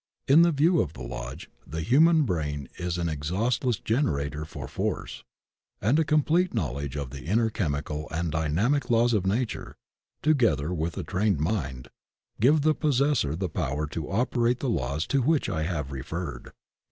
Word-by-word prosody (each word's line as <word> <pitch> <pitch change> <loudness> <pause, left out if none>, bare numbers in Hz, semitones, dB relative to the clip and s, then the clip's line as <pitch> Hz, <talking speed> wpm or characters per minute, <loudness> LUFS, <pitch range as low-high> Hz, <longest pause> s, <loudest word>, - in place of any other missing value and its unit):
In 145 +5 +7
the 170 0 +5
view 160 +3 +3
of 80 - -3
the 60 - -8
Lodge - - -6 0.2
"the 80 +4 -4
human 155 - +5
brain 75 - -2
is 90 -1 -2
an 85 -1 -1
exhaustless 105 - 0
generator 75 - -1
for 70 -4 -7
force," - - -3 0.6
and 120 +10 +2
a - - +4
complete 155 +3 +2
knowledge 70 - -2
of 70 -3 -4
the 70 0 -8
inner 110 +6 +2
chemical 75 -4 -3
and 80 +1 -2
dynamic 85 - +1
laws 120 0 +3
of 95 -3 +1
Nature, 115 +5 -2 0.5
together 110 - +2
with 85 0 -2
a - - -2
trained 95 -3 0
mind, 70 - -2 0.5
give 145 +7 +4
the 155 +2 +3
possessor 140 - +1
the 90 +2 -2
power 75 -4 -2
to 80 -1 -5
operate 120 +3 +1
the 135 - -1
laws 70 - -1
to 140 -1 +1
which 155 +4 +2
I 80 - -2
have 75 -6 -3
referred. 75 +4 -5
90 Hz, 165 wpm, -27 LUFS, -, 0.6 s, In